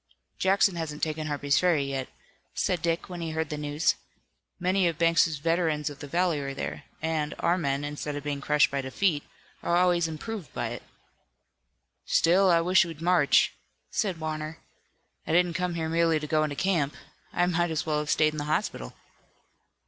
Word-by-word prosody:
"Jackson 190 -1 +3
hasn't 155 -2 -4
taken 155 0 -1
Harper's 145 -1 +1
Ferry 170 -6 +3
yet," 135 -1 -3 0.5
said 180 -3 0
Dick, 165 0 -1
when 180 -2 -7
he 165 - -3
heard 160 -1 -2
the - - -1
news. 150 +1 +1 0.7
"Many 185 +1 +2
of 165 -2 -1
Banks' 165 -2 +3
veterans 160 -1 0
of 145 - -11
the 145 - -7
valley 170 0 +1
are 135 -1 -4
there, - - -5 0.2
and, 155 -2 -1
our 175 - +2
men 140 -5 -1
instead 145 0 -4
of 145 - -5
being 145 -1 -3
crushed 150 +1 +3
by 140 0 -1
defeat, 145 +4 0 0.4
are 170 - +1
always 175 -2 +3
improved 165 - -6
by - - -2
it." - - -6 1.2
"Still, 185 +3 +4
I 170 -1 +5
wish 180 +3 +5
we'd 165 -3 -7
march," 170 -4 +4 0.4
said 190 -6 -1
Warner. 155 0 -4 0.7
"I - - 0
didn't 175 0 +3
come 180 -1 -1
here 160 -1 -2
merely 165 -1 +2
to 150 - -5
go 155 0 +2
into 150 -2 -2
camp. 160 -5 0 0.4
I 175 - +2
might 175 -1 +1
as 160 +2 -2
well 155 -2 0
have 150 0 -4
stayed 155 +1 +3
in 155 - -4
the 145 - -3
hospital." 150 - -2
160 Hz, 185 wpm, -27 LUFS, 150-175 Hz, 1.2 s, I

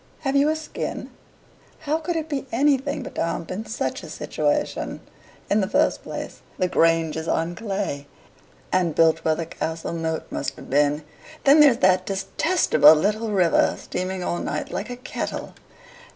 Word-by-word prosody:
have 275 -2 -1
you 280 +2 +4
a 310 - +1
skin? 315 0 -5 0.7
How 310 +1 0
could 340 +2 -3
it 320 -1 -2
be 280 -3 -3
anything 280 +2 +1
but - - -8
damp 165 0 -2
in 210 +5 -5
such - - -3
a - - -10
situation? - - -2 0.5
In 210 - +2
the 190 - 0
first - - +2
place, - - -7 0.2
the 185 - +1
Grange 165 -2 +2
is 160 0 -4
on 165 +2 0
clay, 195 -9 -4 0.6
and 180 -4 +1
built 165 0 +4
where 160 -1 +2
the 165 - -3
castle 160 0 -4
moat 160 -1 -2
must - - -3
have - - -12
been; 145 +2 +2 0.4
then 285 +3 +6
there's 285 -6 +7
that 185 0 +3
destestable 195 - +4
little 210 +7 0
river, 180 -5 +3
steaming 185 0 -4
all 175 - -1
night - - -3
like 210 - -4
a 245 - -4
kettle. 255 - -5
190 Hz, 165 wpm, -23 LUFS, 165-270 Hz, 0.7 s, there's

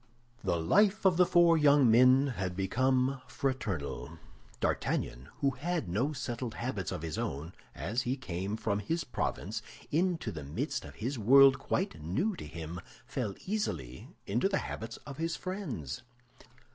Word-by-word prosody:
The 85 - +1
life 200 - +3
of 185 -3 +5
the 180 -1 +5
four 170 -2 +5
young 145 -5 +6
men 130 +3 +6
had 90 -1 -2
become 130 +6 +1
fraternal. 110 - -3 0.4
D'Artagnan, 60 +3 -1
who 140 - +3
had 155 - -2
no 115 - 0
settled 120 -3 -4
habits 115 -7 -3
of 75 - -4
his 80 -2 -3
own, 75 +6 -4 0.2
as 100 - -1
he 130 +1 -1
came 95 -3 -3
from 100 -2 -1
his 165 - -1
province 125 - -3 0.3
into 170 +2 +1
the 75 -3 -6
midst 70 +2 -3
of - - -11
a 125 +5 -2
world 135 +4 +7
quite 185 - -2
new 105 - 0
to - - -7
him, 85 +2 -6 0.2
fell 120 -6 -3
easily 85 - -3 0.2
into 120 - +1
the 195 - +1
habits 115 +1 -5
of 140 -2 -8
his 165 0 -1
friends. 135 - -5
125 Hz, 155 wpm, -31 LUFS, 95-150 Hz, 0.4 s, world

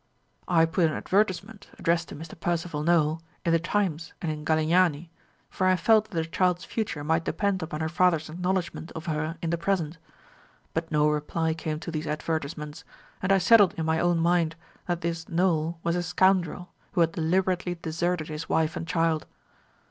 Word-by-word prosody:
"I 165 -2 +4
put 165 +1 +2
an - - -3
advertisement, 200 +1 -1
addressed 170 -1 0
to - - -7
Mr. 160 +2 -9
Percival 170 -3 -1
Nowell, 160 -1 +2 0.2
in 170 - +2
the 165 - +4
Times 170 -3 -1
and 165 - -2
in 150 0 -6
Galignani, 160 +1 +2 0.4
for 185 - -1
I 185 - +5
felt 215 +4 +4
that 195 - -10
the 165 -1 0
child's 180 +2 0
future 210 -10 -3
might 160 +2 +1
depend 190 +4 0
upon 160 -1 -4
her 160 - 0
father's 170 -1 +2
acknowledgment 180 0 -2
of 160 0 -7
her 155 0 -2
in 165 - 0
the 170 - -1
present; 170 -3 -1 0.7
but 165 0 -3
no 150 -1 +3
reply 150 +2 0
came 155 -1 -4
to 170 - -5
these 155 0 -3
advertisements, 150 0 -3 0.4
and 185 - 0
I 195 - +6
settled 200 0 +6
in 160 - -2
my 160 0 +1
own 175 -1 +2
mind 170 -1 +2 0.3
that 175 -1 -1
this 165 0 -3
Nowell 165 -2 +1
was 170 0 +1
a 175 - 0
scoundrel, 180 0 +1 0.2
who 175 - +2
had 165 -1 +3
deliberately 180 +2 0
deserted 165 0 -2
his 155 +1 -6
wife 160 -1 +1
and 165 - -5
child. 165 -2 +1
165 Hz, 185 wpm, -27 LUFS, 160-180 Hz, 0.7 s, I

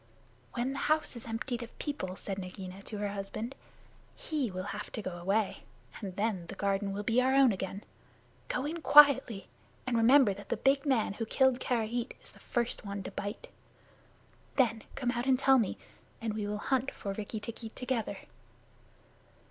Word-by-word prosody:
"When 245 +3 0
the 275 - -4
house 310 -3 +2
is 235 0 -8
emptied 235 +2 -3
of 235 - -9
people," 185 -12 -3
said 195 0 -5
Nagaina 185 0 -7
to 215 - -5
her 205 0 -1
husband, 205 +5 -4 0.6
"he 290 -7 -2
will 185 -1 -4
have 210 - -6
to 220 - -3
go 185 - -3
away, 195 +4 0 0.4
and 190 -4 -5
then 200 -5 -1
the - - -7
garden 200 0 0
will 200 +1 -3
be 230 +4 +3
our 260 +1 +3
own 270 -3 +7
again. 195 +1 -4 0.6
Go 255 - -1
in 325 +3 -3
quietly, 270 -8 +7 0.4
and 250 -2 0
remember 230 -1 +6
that 200 +1 -11
the - - 0
big 275 +2 +2
man 235 -7 +2
who 225 +2 -3
killed 260 +1 +3
Karait 240 0 -1
is - - -10
the - - -18
first 240 0 -1
one 200 -1 -4
to - - -6
bite. 205 - -5 1.1
Then 230 -4 +3
come 250 -3 0
out 245 +1 -2
and 260 -1 +5
tell 270 0 +5
me, 215 - 0 0.4
and 225 -2 -2
we 210 -1 -2
will 210 0 -2
hunt 265 +4 0
for 200 - -5
Rikki 215 +2 -4
tikki 225 +1 -6
together." 250 -1 -2
225 Hz, 180 wpm, -31 LUFS, 200-260 Hz, 1.1 s, own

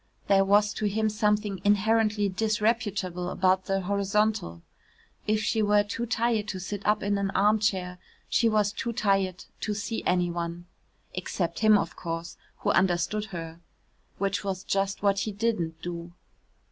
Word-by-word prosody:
There 195 -1 +4
was 205 +1 +3
to 215 - -3
him 215 +2 +1
something 210 -2 0
inherently 210 0 +3
disreputable 205 -3 -1
about 185 0 +2
the 195 0 0
horizontal. 200 - 0 0.6
If 215 0 +1
she 220 +1 +1
were 205 0 +4
too 230 +3 -4
tired 230 -2 0
to 190 -3 -4
sit 200 +2 -5
up 210 0 +2
in 205 0 0
an 200 -1 0
armchair, 195 -3 +1 0.3
she 230 - +3
was 210 -2 +2
too 235 -2 -3
tired 195 -4 0
to 210 - -2
see 220 +2 -3
any 180 -1 +1
one 170 0 -4 0.5
except 175 -2 -3
him, 215 -1 +6
of - - -3
course, 165 0 -5 0.3
who - - +2
understood 190 +3 +1
her 165 -5 -7 0.6
(which 200 +1 -1
was 195 -1 -3
just 195 0 -1
what 200 -1 +3
he 215 - -2
didn't 195 -7 -1
do). 170 -1 -5
200 Hz, 155 wpm, -27 LUFS, 185-215 Hz, 0.6 s, him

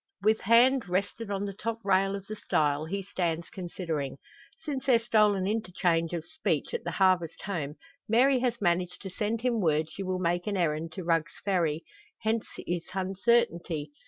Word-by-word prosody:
With 215 +1 +3
hand 235 +1 +4
rested 200 +4 -1
on 200 0 -1
the 200 - -4
top 225 +3 -3
rail 195 0 +3
of 200 -1 -7
the 215 - -6
stile, 150 -6 +1
he 195 +4 -3
stands 170 -3 -2
considering. 165 -7 -4 0.4
Since 275 -3 -4
their 250 -3 +6
stolen 215 -4 +3
interchange 180 -6 0
of 165 -2 -3
speech 315 +8 -2
at 475 - -2
the - - -3
Harvest 185 -4 +2
Home, 155 -8 -3 0.3
Mary 255 +4 +5
has 240 -1 0
managed 180 -1 0
to 190 - -6
send 215 +4 -2
him 240 -3 +1
word 155 -2 +1
she - - -7
will 185 -1 -1
make 175 0 0
an 205 -2 0
errand 160 -2 0
to 185 - -5
Rugg's 165 -2 0
Ferry; 170 -5 +1 0.4
hence 220 +1 0 0.2
his 175 -1 -2
uncertainty. 185 -6 +1
190 Hz, 175 wpm, -29 LUFS, 170-220 Hz, 0.4 s, their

